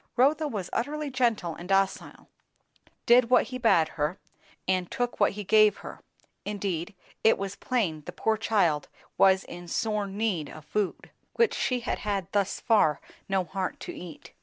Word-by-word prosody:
Rotha 295 +5 +3
was 205 -9 -5
utterly 295 +3 -2
gentle 235 -9 0
and 175 +3 -10
docile; 195 0 0 0.8
did 240 0 +5
what 250 - +4
he 255 0 -5
bade 170 -10 +4
her 155 +4 -2 0.5
and 185 -1 0
took 245 -2 -2
what 205 - +3
he 210 +1 -5
gave 215 +1 +5
her; - - -8 0.4
indeed 200 -2 -3 0.3
it 220 - +5
was 195 0 -4
plain 190 -12 -1
the - - -4
poor 220 - 0
child 200 -9 +1 0.3
was 190 0 +5
in 175 0 -10
sore 210 +3 -1
need 195 -6 -2
of 155 - -11
food, 195 +5 -3 0.2
which 465 -1 +3
she 250 -1 -1
had 235 - -2
had 200 -4 -3
thus 200 -1 0
far 180 -10 +3 0.3
no 190 -1 +1
heart 185 +2 -4
to - - -6
eat. 170 -3 -10
200 Hz, 165 wpm, -27 LUFS, 180-230 Hz, 0.8 s, did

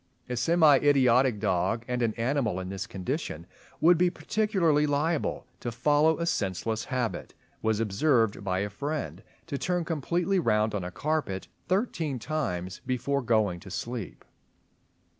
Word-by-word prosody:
A 125 - -3
semi 155 +3 +5
idiotic 130 -5 +4
dog—and 115 +6 0
an 115 -2 0
animal 120 -5 0
in 90 0 -5
this 95 0 -4
condition 95 - -4 0.3
would 170 +2 +5
be 180 0 +4
particularly 175 -7 +1
liable 150 +1 0
to 120 - -4
follow 150 +6 +3
a 170 - -1
senseless 110 - -1
habit—was 115 -3 -3
observed 115 0 +2
by 95 -1 0
a 105 - -2
friend 125 - -4 0.2
to 140 -4 -4
turn 180 -2 -1
completely 170 +4 0
round 110 -6 +2
on 100 -3 -2
a 90 - -4
carpet 120 - -2 0.2
thirteen 175 - 0
times 95 - -3
before 135 +2 0
going 110 -7 +1
to 95 - -12
sleep. 115 +2 -5
125 Hz, 140 wpm, -28 LUFS, 105-155 Hz, 0.3 s, semi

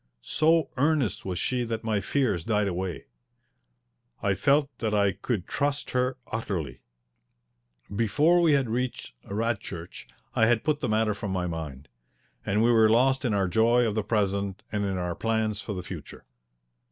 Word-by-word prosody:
So 160 -1 +2
earnest 145 -4 +1
was 90 -2 -3
she 125 +5 0
that 115 -1 -3
my 110 -3 0
fears 105 - 0
died 105 -1 +1
away. 90 -1 -3 1.2
I 100 - +2
felt 140 +9 +3
that 110 -2 0
I 100 -1 +3
could 100 0 -3
trust 145 0 -2
her 125 0 0
utterly. 95 -9 -3 1.1
Before 150 - +3
we 165 -3 +4
had 135 -3 +2
reached 125 - -3
Radchurch 105 -5 -4 0.3
I 110 - +4
had 120 -1 +2
put 150 -1 +1
the 125 - -2
matter 110 0 +2
from 105 0 -5
my 90 -1 -1
mind, 75 -5 -6 0.6
and 105 +2 +1
we 120 - +4
were 110 -2 +5
lost 130 +4 +3
in 115 -5 +1
our 95 -2 +1
joy 115 +5 +3
of 110 - 0
the 110 - 0
present 100 -1 -1
and 105 -1 -1
in 95 -1 -1
our 90 -1 -2
plans 110 0 -1
for 105 - -5
the 90 - -5
future. - - -9
110 Hz, 165 wpm, -27 LUFS, 100-125 Hz, 1.2 s, were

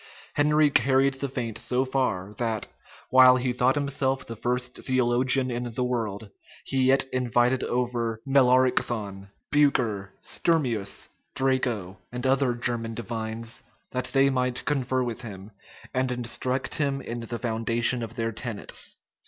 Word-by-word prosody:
[*] - - -21
Henry 150 0 +4
carried 135 0 +3
the 135 +1 -4
feint 120 -4 -4
so 130 +1 0
far, 105 -8 -1
that, 115 -3 0 0.5
while 130 0 +8
he 125 0 -1
thought 125 +2 +2
himself 135 -2 0
the 115 - -7
first 125 +2 -1
theologian 130 +1 +2
in 120 -1 -4
the 125 - 0
world, 110 -5 -3 0.3
he 130 -1 0
yet 135 +1 +4
invited 125 0 +2
over 120 -2 -1
Melaricthon, 125 -7 +2 0.2
Bucer, 120 -9 +2
Sturmius, 120 -12 0 0.3
Draco, 125 -8 0
and 125 +1 -5
other 130 -2 +2
German 120 -1 -3
divines, 115 0 -4 0.3
that 130 0 -2
they 135 0 +3
might 125 -1 -1
confer 130 -3 0
with 120 -2 -4
him, 100 -3 -9 0.4
and 130 0 0
instruct 125 +2 -1
him 140 -3 0
in 120 +1 -5
the 115 0 -5
foundation 115 +1 +1
of 115 0 -6
their 115 -2 -1
tenets. 110 -1 -4
125 Hz, 140 wpm, -26 LUFS, 115-130 Hz, 0.5 s, while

